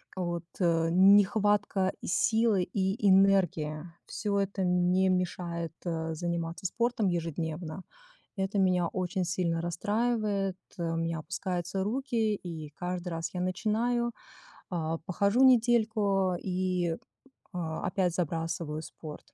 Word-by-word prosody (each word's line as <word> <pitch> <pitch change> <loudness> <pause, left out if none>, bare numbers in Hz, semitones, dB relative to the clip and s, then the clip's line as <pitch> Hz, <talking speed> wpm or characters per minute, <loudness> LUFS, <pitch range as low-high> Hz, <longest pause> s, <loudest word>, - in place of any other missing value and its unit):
вот, 175 -2 -3
э, 165 -2 +2
нехватка 200 +1 +4
силы 220 +1 +2
и 190 +1 -1
энергии. 185 -6 +3 0.2
Всё 205 -1 -1
это 195 0 -2
мне 180 +1 +3
мешает, 170 -2 -2
э, 160 -1 -2
заниматься 170 +1 -3
спортом 235 +1 0
ежедневно. 165 0 -3 0.6
Это 195 +1 0
меня 180 -2 +3
очень 185 +1 -2
сильно 170 -1 0
расстраивает, 205 +2 0 0.2
э, 175 - -3
у - - -1
меня 165 0 -1
опускаются 180 +3 -3
руки 225 -1 0
и 165 -5 -7
каждый 180 +3 -4
раз 165 -1 -4
я 180 - -2
начинаю, 230 +6 0 0.6
а, 165 -2 -2
похожу 200 +8 +2
недельку 220 -6 +3
и, 180 -2 -1 0.6
а, 165 -3 -3
опять 180 -2 0
забрасываю 165 -2 -2
спорт. 155 -1 -10
180 Hz, 115 wpm, -29 LUFS, 170-200 Hz, 0.6 s, нехватка